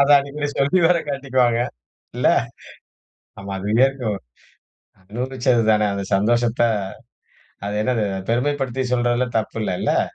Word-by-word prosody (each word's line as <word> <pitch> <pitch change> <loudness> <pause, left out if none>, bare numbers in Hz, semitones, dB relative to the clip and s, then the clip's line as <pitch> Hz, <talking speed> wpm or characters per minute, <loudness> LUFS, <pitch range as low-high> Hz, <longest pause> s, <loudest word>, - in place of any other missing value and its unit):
அதான் 140 0 +5
இனிமே 145 +1 -3
சொல்லி 140 +7 +2
வேற 175 0 +4
காட்டிக்குவாங்க. 130 -4 +1 0.6
இல்ல. - - +3 1.1
ஆமா 100 0 -7
அது 100 - -5 0.2
இருக்கும். 125 -7 -2 0.9
அனுபவிச்சதுதானே 115 0 +1
அந்தச் 100 0 -2
சந்தோஷத்த 120 +3 +1 1.1
அது 105 - -3
என்னது? 115 -2 0 0.3
பெருமைப்படுத்திச் 130 0 -1
சொல்றதுல 120 +1 +1
தப்பு 110 +1 -4
இல்லை 95 - -1
இல்ல. - - +2
120 Hz, 110 wpm, -21 LUFS, 110-135 Hz, 1.1 s, அதான்